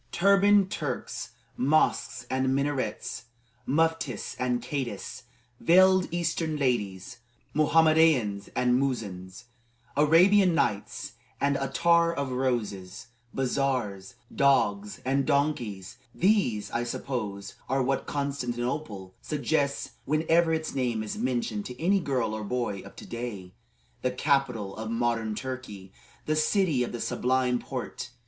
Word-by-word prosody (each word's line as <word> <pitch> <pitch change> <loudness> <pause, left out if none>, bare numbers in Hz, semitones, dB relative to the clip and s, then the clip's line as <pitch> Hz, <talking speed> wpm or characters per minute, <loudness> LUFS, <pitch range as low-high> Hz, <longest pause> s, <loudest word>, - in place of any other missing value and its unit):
Turbaned 200 +1 +4
Turks, 150 -8 -4 0.2
mosques 130 -3 +1
and 130 +1 0
minarets, 140 -3 -2 0.4
muftis 160 -5 0
and 125 -1 0
cadis, 120 -6 -5 0.3
veiled 185 +1 +5
eastern 165 -2 -1
ladies, 120 -3 -1 0.3
Mohammedains 155 -9 +3
and 125 0 +3
muezzins, 100 -7 -4 0.5
Arabian 175 +5 +5
Nights 105 -10 -1 0.3
and 140 0 +2
attar 170 +5 +3
of 140 -3 -2
roses, 115 -7 -2 0.2
bazars, 125 -7 -1 0.2
dogs, 105 -7 +2
and 135 +1 +2
donkeys 125 -9 -1 0.2
these, 185 - +1
I 120 - -1
suppose, 110 -5 -4 0.2
are 135 0 +2
what 135 +1 -1
Constantinople 125 -7 -3
suggests 140 -2 -1
whenever 160 +3 +2
its 160 -1 -1
name 120 -5 -1
is 110 - -5
mentioned 120 -5 -2
to 125 0 -9
any 195 +4 +3
girl 130 - -1
or 110 0 -4
boy 115 -2 -2
of 100 - -13
to - - -10
day, 105 -6 -6 0.5
the 130 - +1
capital 125 -6 0
of 110 0 -5
modern 115 -2 0
Turkey, 105 -7 -7 0.3
the 155 - +1
city 155 -2 +2
of - - -4
the 120 - -5
Sublime 125 -1 +1
Porte. 125 0 -6
130 Hz, 115 wpm, -27 LUFS, 115-155 Hz, 0.5 s, veiled